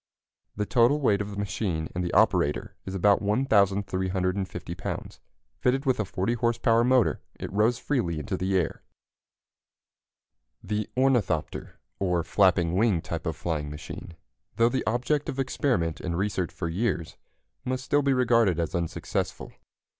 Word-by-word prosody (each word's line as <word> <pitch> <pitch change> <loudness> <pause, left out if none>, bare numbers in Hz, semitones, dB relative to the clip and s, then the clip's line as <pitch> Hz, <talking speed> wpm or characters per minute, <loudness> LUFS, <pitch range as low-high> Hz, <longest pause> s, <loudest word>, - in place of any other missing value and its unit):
The 105 - -1
total 125 +6 +3
weight 105 -8 +2
of 100 0 -5
machine 90 -5 -2
and 90 -1 -2
operator - - +2
is 95 - -4
about 100 +2 +4
1,350 100 -4 0
lbs. - - -6 0.4
Fitted 135 +3 +1
with 130 -3 +2
a 110 - +1
40 95 +4 -1
horse 120 0 0
power 115 -1 +3
motor, 125 -1 +3 0.2
it - - -6
rose 110 +4 +3
freely 105 - -1
into 75 - -3
the 95 +1 0
air. 90 - -1 1.8
The 105 -1 -2
ornithopter, 125 - 0 0.2
or 90 -3 +1
flapping 90 -1 +3
wing 100 -3 +2
type 80 -1 -5
of 80 - -1
flying 80 -2 -3
machine, 75 +3 -8 0.4
though 115 +1 +4
the 130 +1 -1
object 125 +6 0
of 130 - -4
experiment 125 - 0
and 85 -2 -2
research 95 -2 -1
for 85 - -4
years, 85 -2 -2 0.5
must 130 +1 -3
still 145 0 +3
be 140 -1 +2
regarded 115 -8 +3
as 85 - -2
unsuccessful. 85 -2 -3
100 Hz, 145 wpm, -27 LUFS, 90-120 Hz, 1.8 s, about